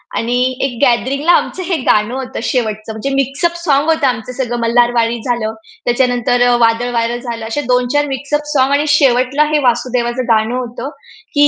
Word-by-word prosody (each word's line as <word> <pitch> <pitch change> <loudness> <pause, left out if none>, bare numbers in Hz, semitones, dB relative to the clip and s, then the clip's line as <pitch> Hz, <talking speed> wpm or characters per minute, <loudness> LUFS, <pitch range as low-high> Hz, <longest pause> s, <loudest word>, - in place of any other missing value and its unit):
आणि 240 +2 -1 0.3
एक 245 -3 -4
गॅदरिंगला 275 +5 +2
आमचं 370 +1 +1
हे 355 0 -1
गाणं 215 -3 +1
होतं 265 0 -5
शेवटचं 220 -3 -2
म्हणजे 220 +6 -4
मिक्स 275 +2 -1
अप 340 0 +1
सॉँग 290 -1 +2
होतं 315 -4 +2
आमचं 245 0 -3
सगळं 240 -2 -3
मल्हारवाडी 235 0 +2
झालं, 235 -3 -1 0.3
त्याच्यानंतर 245 0 +1
अ, 245 - +4
वादळवारं 235 +1 +1
झालं. 235 -3 -6
असे 230 +6 -2
2-4 250 +4 +2
मिक्स 275 +2 -6
अप 295 0 +1
सॉँग 265 0 +2
आणि 290 +2 +2
शेवटला 275 -1 +3
हे 300 - +4
वासुदेवाचं 245 0 0
गाणं 220 +2 +2
होतं. 250 +1 -5 0.4
की 290 0 +5
245 Hz, 175 wpm, -15 LUFS, 235-275 Hz, 0.4 s, की